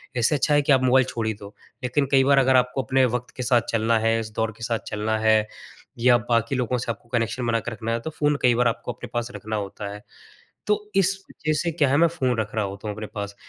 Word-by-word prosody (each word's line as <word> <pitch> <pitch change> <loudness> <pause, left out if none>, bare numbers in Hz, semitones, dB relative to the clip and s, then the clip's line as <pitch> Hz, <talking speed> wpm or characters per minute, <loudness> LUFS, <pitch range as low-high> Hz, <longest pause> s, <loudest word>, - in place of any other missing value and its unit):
इससे 120 +5 +2
अच्छा 145 +2 +1
है 145 - +5
कि 145 - +1
आप 130 -1 +4
मोबाइल 130 0 +4
छोड़ 115 -2 -3
ही 110 - 0
दो, 100 0 -12 0.3
लेकिन 125 +3 +1
कई 135 -1 +5
बार 140 +1 +4
अगर 130 0 +3
आपको 125 +1 +2
अपने 130 0 +3
वक़्त 125 - -13
के 125 - -3
साथ 120 -1 +3
चलना 115 0 +2
है, 115 +1 +1
इस 110 -1 -6
दौर 110 0 0
के 115 - -10
साथ 115 -2 -1
चलना 110 +1 -1
है 110 0 +4 0.6
या 120 0 +5
बाकी 115 +2 +1
लोगों 125 -1 0
से 120 -1 -2
आपको 115 +1 -11
कनेक्शन 120 +1 -1
बना 115 -1 +2
कर 120 - -6
रखना 115 0 -4
है 115 - 0
तो 160 - -5
फ़ोन 150 -1 0
कई 125 -1 +4
बार 125 0 +3
आपको 115 +1 -2
अपने - - -9
पास 120 0 -2
रखना 110 +2 -5
होता 100 0 -5
है। 105 - -9 0.7
तो 210 - +4 0.2
इस 195 0 +4 0.2
वजह 155 0 -2
से 170 - -1
क्या 150 -4 +1
है, 140 - +3
मैं 170 +2 +5
फ़ोन 130 -7 -1
रख 105 -1 -3
रहा 110 - +1
होता 100 +2 -7
हूँ 105 - -4
अपने 110 -1 -6
पास, 100 -1 -6
120 Hz, 265 wpm, -24 LUFS, 110-130 Hz, 0.7 s, है